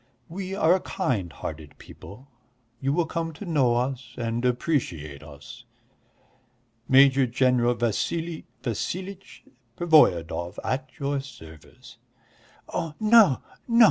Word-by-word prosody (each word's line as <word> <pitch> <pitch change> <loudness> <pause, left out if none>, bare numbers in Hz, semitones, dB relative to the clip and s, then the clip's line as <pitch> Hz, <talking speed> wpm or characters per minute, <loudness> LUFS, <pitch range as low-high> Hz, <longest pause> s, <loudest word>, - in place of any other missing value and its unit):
We 190 +2 -5
are 180 -1 +3
kind 100 - -2
hearted 75 -1 -8
people, 125 +8 -13 0.5
you 135 +2 0
will 165 +3 +1
come 165 0 -4
to 155 - -9
know 135 -8 +2
us 125 -1 -3
and 115 0 -2
appreciate 120 - -1
us. 75 -2 -12 1.3
Major 135 0 +6
General 120 0 +2
Vassili 155 - -2 0.2
Vassilitch 185 - -5 0.3
Pervoyedov, 90 - +3
at 130 0 -2
your 140 0 -1
service." 80 - -14 0.7
"Oh, 160 -2 -3
no, 215 - +5 0.2
no! 235 -1 +2
130 Hz, 110 wpm, -25 LUFS, 115-165 Hz, 1.3 s, Major